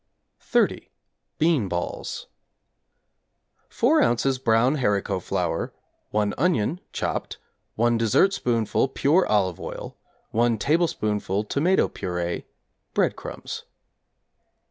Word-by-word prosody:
=30. - - +1 0.5
Bean 155 - +2
Balls= 90 -1 -4 1.4
4 300 +6 +3
ozs. 130 - +1
brown 120 +6 +3
haricot 100 -6 0
flour, - - -2 0.4
1 105 -1 0
onion 165 - +1
(chopped), - - -3 0.4
1 120 +1 +2
dessertspoonful 115 - +2
pure 165 +7 +3
olive 95 -5 +1
oil, - - -7 0.4
1 115 0 +2
tablespoonful 105 - 0
tomato 160 - +2
purée, 90 -1 -3 0.5
breadcrumbs. - - -2
115 Hz, 85 wpm, -25 LUFS, 105-150 Hz, 1.4 s, 4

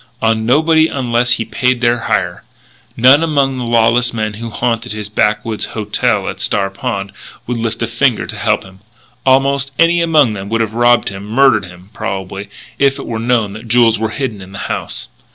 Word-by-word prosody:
On 110 0 0
nobody 160 +4 +4
unless 125 -4 0
he 115 - -2
paid 125 +3 0
their 120 0 +2
hire. - - -1 0.5
None 130 +5 +6
among 140 -5 +1
the - - -3
lawless 120 +1 +2
men 110 -1 -2
who 115 +3 -6
haunted 115 +1 -2
his 105 -1 -6
backwoods 105 +1 0
"hotel" 105 0 0
at - - -5
Star 100 -1 0
Pond 100 0 -4 0.3
would 125 0 -3
lift 115 0 -2
a - - +2
finger 115 +1 0
to - - -6
help - - 0
him. 95 0 -15 0.5
Almost 135 +1 +3
any 170 +1 +4
among 155 -8 +3
them 100 -1 -6
would 115 +1 0
have 110 -1 -2
robbed 120 +1 +3
him, 100 +1 -8
murdered 115 -3 +3
him, 90 +3 -15
probably, 95 +1 -5 0.3
if 140 0 +3
it 140 - -7
were 115 -1 -4
known 115 -3 0
that 110 +2 -10
jewels 115 -1 +3
were 110 0 -1
hidden 115 -4 -4
in 95 +1 -12
the - - -7 0.2
house. - - -5
115 Hz, 190 wpm, -15 LUFS, 105-130 Hz, 0.5 s, None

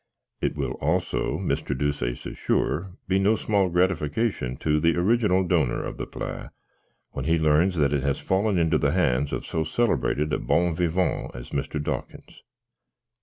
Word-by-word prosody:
"It - - 0
will, - - -1
also, 80 +5 0
Mr. 70 - -2
Deuceace 65 -4 -2
is - - -6
sure, 90 +4 -1
be 95 +1 +2
no 100 +3 +3
small 100 -4 +1
gratification 90 - 0
to 75 -1 +1
the 85 +1 +3
original 95 0 +3
donor 90 - +1
of - - -6
the - - -5
pate, - - -6 0.6
when 65 - -5
he 80 +1 +3
learns 80 +4 +3
that 70 -2 +2
it 70 - +1
has 70 0 0
fallen 95 +1 +1
into 80 -2 +2
the 70 0 +1
hands 70 -6 +1
of - - -3
so 80 - -1
celebrated 75 -9 0
a - - +1
bon 85 -1 +1
vivant 90 -2 0
as - - -9
Mr. 70 +2 -2
Dawkins. 75 - -5
80 Hz, 170 wpm, -25 LUFS, 75-95 Hz, 0.6 s, no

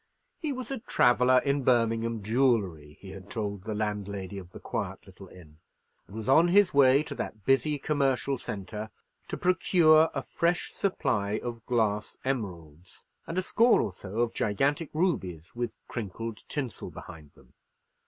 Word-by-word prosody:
He 310 -4 -2
was 255 0 -5
a 270 - -3
traveller 125 - +4
in 140 0 +1
Birmingham 115 -2 +1
jewellery, 100 - +1
he 95 -1 -9
told 100 0 -5
the 110 -1 -3
landlady 100 -2 -3
of 90 -2 -11
the - - -11
quiet - - -4
little - - -13
inn, 80 -4 -16 0.5
and 100 - -13
was 110 -1 -6
on 160 +6 +6
his 190 +1 +4
way 140 0 +6
to - - -6
that 105 -3 -6
busy 145 +3 +2
commercial 135 -2 0
centre 105 +1 -6 0.4
to - - -4
procure 165 -3 +4
a - - -2
fresh 170 +1 0
supply 110 - -1
of 115 -2 -5
glass 105 -3 0
emeralds, 90 - -5 0.2
and 165 - -4
a 185 - +1
score 230 +5 +4
or - - -1
so 100 +4 -4
of 120 -1 0
gigantic 140 +9 0
rubies 125 - -2
with 120 -1 -3
crinkled 115 0 -6
tinsel 130 -6 -4
behind 80 -5 -11
them. 65 -2 -22
115 Hz, 155 wpm, -28 LUFS, 100-140 Hz, 0.5 s, on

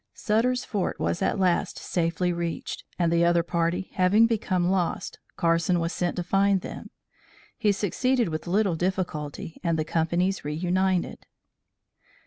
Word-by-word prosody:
Sutter's 245 +3 +1
Fort 200 -4 -2
at 190 +5 0
last 180 -2 +1
was - - -9
safely 175 +1 0
reached, 170 -1 -4
and 170 -2 +1
the 170 0 +3
other 170 0 +3
party 170 +2 -1
having 195 +5 +4
become 195 -6 0
lost, 185 -3 -1 0.2
Carson 170 +1 +2
was 165 +1 -2
sent 175 -1 -1
to 180 - -2
find 195 +1 +2
them. - - -8 0.7
He 215 -3 +2
succeeded 235 +3 +1
with 155 +1 -4
little 195 -1 +2
difficulty 165 -4 -3
and 165 -2 +1
the 155 - -1
companies 170 +4 0
reunited. 180 +4 -1
180 Hz, 140 wpm, -26 LUFS, 170-195 Hz, 0.7 s, having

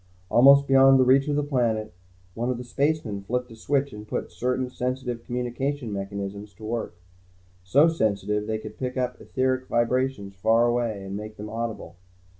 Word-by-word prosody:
Almost 140 +3 +7
beyond 135 -1 +6
reach 135 +3 +4
of 145 - 0
the 150 - +1
planet, 115 -7 0 0.4
one 120 +4 -2
of 125 - -1
the 125 - -6
spacemen 135 -5 -1
flipped 125 +4 -3
a - - -10
switch 140 +5 -1
and 105 0 -9
put - - -4
certain 125 +1 -1
sensitive 125 -1 -3
communication 125 0 -3
mechanisms 100 0 -5
to 110 - -15
work. 115 -4 -3 0.7
So 140 - +5
sensitive, 105 - 0
they 110 - -1
could 110 0 -10
pick 125 0 -3
up 125 -1 -2
etheric 130 0 -1
vibrations 120 -3 0
far 110 +5 +3
away 120 -4 0
and 95 0 -5
make 105 +1 -7
them 105 +1 -7
audible. 115 -4 -5
120 Hz, 170 wpm, -25 LUFS, 105-130 Hz, 0.7 s, Almost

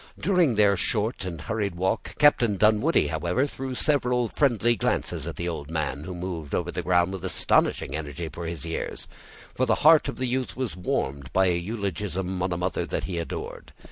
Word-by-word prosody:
During 175 - +3
their 105 -1 +5
short 105 +3 -1
and 85 -3 -5
hurried 100 +2 -2
walk, 95 +5 -1
Captain 120 -8 +4
Dunwoodie, 110 - +3
however, 85 - 0
threw 135 -2 -5
several 125 -5 +1
friendly 120 -4 +2
glances - - -1
at - - -5
the 85 - -3
old 80 -4 -4
man, 75 -2 -2
who 90 0 -6
moved 85 -4 -4
over 85 0 -1
the 90 - -3
ground 90 +1 +2
with 95 - -6
astonishing 65 - +1
energy 80 +2 -5
for 80 +3 -6
his 80 -2 -5
years, 80 - -4 0.5
for - - 0
the - - +4
heart 155 -2 +7
of - - -6
the 130 - -1
youth 125 -5 -2
was 130 -5 -2
warmed 70 -7 -2
by 95 0 +4
an 85 -1 0
eulogium 95 -2 -3
on 90 0 0
a 90 - -1
mother 90 0 -1
that - - -2
he 90 -3 -3
adored. 85 - -6
95 Hz, 195 wpm, -26 LUFS, 85-120 Hz, 0.5 s, heart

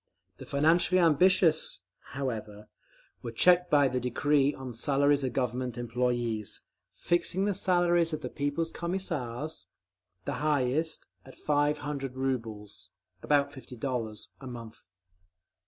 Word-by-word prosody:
The - - -10
financially 165 +6 +3
ambitious, 165 - +3 0.3
however, 110 -6 -5 0.5
were 115 - -5
checked 180 +9 +4
by 145 -2 +5
the 130 0 -1
decree 140 +3 +2
on 130 -3 -8
Salaries 140 +4 +2
of 130 - -1
Government 125 -1 -2
Employees, 120 -2 -2 0.3
fixing 175 +2 0
the 205 - +1
salaries 175 -3 +2
of 155 -1 -3
the - - -3
People's 145 +4 -2
Commissars—the 120 - -5
highest—at 150 +1 -2
five 145 0 +1
hundred 140 -3 -5
rubles 115 -6 -4 0.3
(about 140 -1 +2
fifty 130 -2 -11
dollars) 115 -4 -3
a 135 - -8
month…. 115 -3 -9
140 Hz, 115 wpm, -29 LUFS, 120-155 Hz, 0.5 s, by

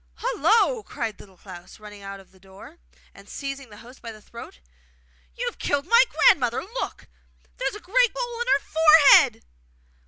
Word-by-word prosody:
'Hullo!' 465 0 +1
cried 230 - -6
Little 190 -3 -17
Klaus, 180 -1 -14
running 210 -1 -13
out 195 0 -9
of 190 - -20
the 190 - -24
door, 190 +1 -16 0.3
and 200 0 -17
seizing 275 -2 -7
the 205 - -15
host 250 +2 -16
by 230 - -8
the 215 - -14
throat. 235 - -13 0.8
'You 485 - -5
have 480 - -6
killed 285 0 -2
my 470 +1 +5
grandmother! 245 -4 +2
Look! 470 +6 -7 0.5
there - - -3
is - - -4
a - - -9
great 485 +6 +1
hole 480 -1 -5
in 485 - -4
her 280 - +2
forehead! 315 -2 +5
275 Hz, 180 wpm, -23 LUFS, -, 0.8 s, my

